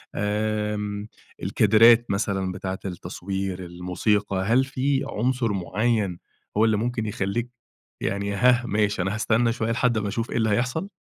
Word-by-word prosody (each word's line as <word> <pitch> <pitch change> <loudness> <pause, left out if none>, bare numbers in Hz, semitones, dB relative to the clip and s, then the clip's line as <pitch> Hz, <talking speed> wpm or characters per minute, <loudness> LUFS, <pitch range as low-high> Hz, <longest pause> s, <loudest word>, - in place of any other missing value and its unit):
آمم، 105 0 -2 0.4
الكادرات 115 +3 +5
مثلًا 100 -2 -1
بتاعة 95 0 -4
التصوير 95 0 -4
الموسيقى، 90 +4 -1
هل 125 +4 +4
في 135 0 0
عنصر 120 -1 0
معيّن 100 0 0 0.4
هو 110 - +5
اللي 110 -2 +2
ممكن 115 0 -2
يخليك 105 +4 -2 0.5
يعني 100 0 -1
هاه 125 +2 +4
ماشي 105 -3 0
أنا 95 +4 -1
هاستنى 115 +1 +2
شويّة 115 -2 -1
لحد 120 -1 +1
ما 105 -1 -1
أشوف 115 +3 -3
إيه - - -1
اللي 110 -1 +2
هيحصل؟ 125 - 0
105 Hz, 140 wpm, -24 LUFS, 100-120 Hz, 0.5 s, الكادرات